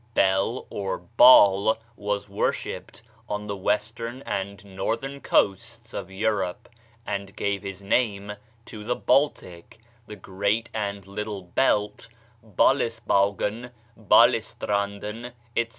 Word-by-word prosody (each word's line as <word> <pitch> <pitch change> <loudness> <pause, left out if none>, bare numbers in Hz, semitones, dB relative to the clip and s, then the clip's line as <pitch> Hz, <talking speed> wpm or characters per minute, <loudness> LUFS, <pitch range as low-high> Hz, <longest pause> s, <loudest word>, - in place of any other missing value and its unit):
Bel, 95 +5 +2
or 100 -1 -3
Baal, 105 0 +6 0.2
was 105 0 -3
worshipped 100 0 -3 0.3
on 105 0 -3
the 100 -1 -4
western 110 +6 -2
and 100 0 -4
northern 115 +8 -4
coasts 115 +3 0
of 95 -2 -5
Europe, 95 -2 -2 0.4
and 100 0 -4
gave 100 -2 -1
his 100 -1 -7
name 105 -1 0 0.3
to 105 -1 -9
the 125 +3 -1
Baltic, 100 - 0 0.3
the 105 - -8
Great 100 +4 -2
and 100 -3 -3
Little 100 0 -5
Belt, 105 +2 0 0.3
Balesbaugen, 115 -1 +1 0.3
Balestranden, 105 +2 +1 0.2
etc. 115 0 +1
105 Hz, 105 wpm, -25 LUFS, 100-115 Hz, 0.4 s, Baal